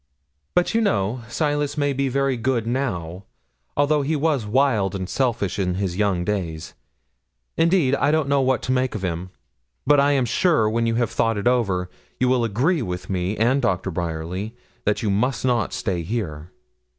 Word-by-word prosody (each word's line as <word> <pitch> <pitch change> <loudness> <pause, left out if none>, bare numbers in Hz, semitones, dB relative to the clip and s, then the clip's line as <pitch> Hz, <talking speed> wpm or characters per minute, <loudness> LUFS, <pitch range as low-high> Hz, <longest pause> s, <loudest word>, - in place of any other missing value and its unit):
'But, 180 - +2
you 230 - +2
know, 115 - 0
Silas 145 +2 -1
may 145 -1 +1
be 135 0 0
very 135 0 +1
good 120 -1 0
now, 100 -8 -3 0.5
although 145 +1 +3
he 150 +3 0
was 145 -7 0
wild 110 -5 +2
and 95 -1 -3
selfish 120 -7 -1
in 90 -2 0
his 95 -2 -2
young 95 -3 0
days. 85 -7 -3 0.8
Indeed 165 -5 +3
I 140 +1 +2
don't 155 -2 +2
know 140 0 +3
what 130 -1 +1
to 125 - -1
make 130 -2 0
of 100 - -4
him; 90 0 -3 0.6
but 145 +1 +5
I 140 +1 +4
am 135 -3 +2
sure 150 -2 +2
when 115 +2 0
you 115 - +1
have 120 -2 0
thought 115 -1 +1
it 100 - -3
over, 100 -8 +1 0.3
you 125 - +2
will 125 -2 +2
agree 130 - +1
with 90 -3 -5
me 95 +2 -1
and 130 +5 +2
Doctor 95 -4 0
Bryerly, 85 +6 -4 0.3
that 105 +2 0
you 105 - +1
must 125 +5 0
not 120 -4 +1
stay 105 -8 -2
here.' 80 -5 -4
115 Hz, 185 wpm, -23 LUFS, 95-135 Hz, 0.8 s, but